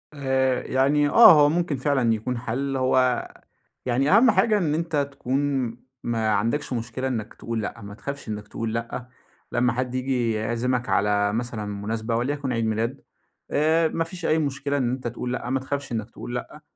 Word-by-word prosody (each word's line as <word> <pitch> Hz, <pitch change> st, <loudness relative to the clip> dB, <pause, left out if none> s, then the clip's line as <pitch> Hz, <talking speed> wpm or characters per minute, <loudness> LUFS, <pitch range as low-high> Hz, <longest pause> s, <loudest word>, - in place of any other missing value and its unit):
آآ، 130 Hz, -2 st, +1 dB
يعني 145 Hz, +3 st, +2 dB
آه، 230 Hz, +9 st, +9 dB
هو 145 Hz, -2 st, +6 dB
ممكن 170 Hz, -2 st, 0 dB
فعلًا 130 Hz, -4 st, +2 dB
يكون 115 Hz, +3 st, -2 dB
حَل، 135 Hz, +4 st, -2 dB
هو 130 Hz, -1 st, +2 dB, 0.6 s
يعني 130 Hz, +3 st, +1 dB
أهم 240 Hz, 0 st, +6 dB
حاجة 215 Hz, 0 st, +3 dB
إن 165 Hz, -7 st, 0 dB
أنتَ 165 Hz, 0 st, -2 dB, 0.2 s
تكون 135 Hz, -1 st, -1 dB, 0.4 s
ما 115 Hz, -2 st, 0 dB
عندكش 115 Hz, +7 st, 0 dB
مشكلة 120 Hz, +2 st, -3 dB
إنك 115 Hz, -4 st, -3 dB
تقول 115 Hz, -1 st, -4 dB
لأ، 105 Hz, -, -5 dB
ما 100 Hz, 0 st, -8 dB
تخافش 140 Hz, +5 st, -7 dB
إنك 105 Hz, -1 st, -5 dB
تقول 115 Hz, -1 st, -4 dB
لأ. 115 Hz, +1 st, -4 dB, 0.4 s
لما 125 Hz, 0 st, +2 dB
حد 125 Hz, +1 st, -2 dB
ييجي 130 Hz, -3 st, 0 dB
يعزِمَك 120 Hz, +3 st, -1 dB
على 100 Hz, 0 st, +2 dB
مثلًا 115 Hz, -2 st, -3 dB
مناسبة 110 Hz, +3 st, -3 dB
وليكن 135 Hz, +2 st, -1 dB
عيد 115 Hz, -1 st, 0 dB
ميلاد 115 Hz, +5 st, -1 dB, 0.5 s
آآ، 160 Hz, +2 st, +3 dB
ما 165 Hz, -, -1 dB
فيش 175 Hz, +1 st, -8 dB
أي 160 Hz, -, +3 dB
مشكلة 140 Hz, -1 st, -1 dB
إن 125 Hz, -3 st, 0 dB
أنتَ 130 Hz, -1 st, -3 dB
تقول 125 Hz, +1 st, -4 dB
لأ، 125 Hz, -1 st, -4 dB
ما 135 Hz, -, +1 dB
تخافش 140 Hz, +1 st, -4 dB
إنك 110 Hz, -1 st, -3 dB
تقول 120 Hz, -, -7 dB
لأ. 150 Hz, +5 st, -6 dB
125 Hz, 180 wpm, -24 LUFS, 115-140 Hz, 0.6 s, آه